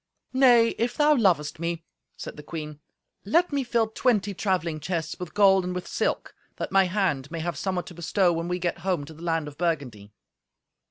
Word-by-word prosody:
"Nay, 245 -3 +6
if 235 +2 -1
thou 300 0 +5
lovest 175 - +2
me," 170 0 -3 0.3
said - - -7
the 150 - -9
queen, 150 -1 -7 0.4
"let 325 - +2
me 280 -1 +1
fill 235 -2 +1
twenty 215 -3 +1
travelling 175 -4 -1
chests 165 0 -3
with 180 -2 -7
gold 195 -2 +5
and 180 0 -3
with 180 - -4
silk, - - -2 0.2
that - - -5
my 195 0 +5
hand 180 -8 -1
may 165 -1 -5
have 175 +1 -3
somewhat 185 -2 -2
to - - -10
bestow 175 +2 +1
when 165 +1 -3
we 180 0 -1
get 175 -1 -2
home 175 -4 -1
to 160 - -11
the 160 - -14
land 165 -3 -1
of 145 0 -11
Burgundy." 140 -12 -2
180 Hz, 200 wpm, -26 LUFS, 160-205 Hz, 0.4 s, Nay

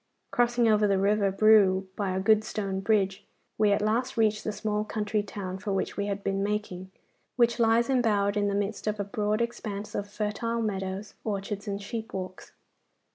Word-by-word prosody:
Crossing 240 -1 +2
over 210 -1 +4
the 195 -1 +2
river 200 +1 +2
Brue 195 -2 +5
by 200 -2 -1
a 185 0 -1
good 215 +2 +4
stone 195 -3 -3
bridge, 195 -1 +1 0.4
we 210 -1 +4
at 200 - +2
last 235 +4 0
reached 215 -1 +2
the 215 - -2
small 210 0 -2
country 215 -1 -1
town 195 -2 -6
for 205 0 -3
which 195 - -2
we 200 0 -2
had 200 0 -3
been 195 0 -1
making, 200 -3 -3 0.5
which 235 -1 +3
lies 230 +1 +4
embowered 215 -6 +2
in 205 -1 +1
the 200 - 0
midst 205 +2 -2
of 210 0 -1
a - - +1
broad 210 +1 -1
expanse 215 -3 -5
of 205 0 -3
fertile 215 +2 -2
meadows, 195 -1 -3
orchards, 200 0 -4
and 200 0 -3
sheep 225 +2 -6
walks. 185 -1 -6
210 Hz, 185 wpm, -28 LUFS, 200-220 Hz, 0.5 s, Brue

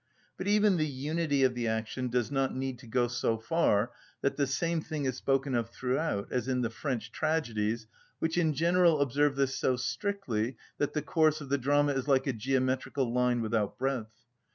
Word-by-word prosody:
But 185 - -5
even 205 -2 +4
the 155 -1 +1
unity 145 +1 0
of 130 -1 +4
the 120 -1 -2
action 110 +3 -2
does 120 -1 0
not 135 -2 0
need 130 -1 -3
to 125 - -13
go 120 +1 +1
so 120 -2 0
far 115 -4 +1 0.3
that 140 - +1
the 140 -1 +1
same 165 +4 0
thing 155 -2 -4
is 130 -2 0
spoken 135 0 0
of 115 -2 0
throughout, 125 -3 -2
as 125 -1 -1
in 130 -1 +1
the 115 -2 -1
French 120 -2 -3
tragedies 115 -9 -1 0.3
which 160 0 -1
in 160 -4 +2
general 170 0 +4
observe 140 +1 +2
this 135 -1 +1
so 130 0 +1
strictly 130 - -2 0.2
that 145 - 0
the 150 - -1
course 155 0 +2
of 140 -3 -8
the 140 0 +1
drama 145 +2 +2
is 135 0 -2
like 135 -2 +3
a 135 - 0
geometrical 130 +1 0
line 125 -1 +2
without 110 -2 -1
breadth. 115 -4 -3
135 Hz, 195 wpm, -30 LUFS, 120-150 Hz, 0.3 s, even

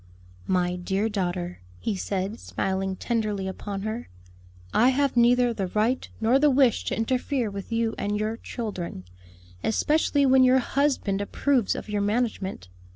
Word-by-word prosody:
"My 180 -1 +1
dear 195 +4 -1
daughter," 180 -3 -3 0.2
he 215 - -2
said, 195 +3 -3
smiling 190 0 -2
tenderly 210 -3 -1
upon 195 +1 -5
her, 220 +3 -4 0.6
"I 245 +3 +5
have 275 0 +1
neither 245 0 +4
the 195 -4 -2
right 220 +7 0
nor 235 +4 +3
the 295 +1 +5
wish 260 -4 +3
to - - -2
interfere 250 0 0
with 200 +2 -7
you 230 0 0
and 205 +1 -1
your 215 +1 -1
children; 200 - -5 0.6
especially 290 +4 +2
when 260 0 +6
your 255 +1 +6
husband 260 -7 0
approves 245 +2 +1
of - - -6
your 210 -1 -1
management. 205 - -1
220 Hz, 150 wpm, -26 LUFS, 195-250 Hz, 0.6 s, when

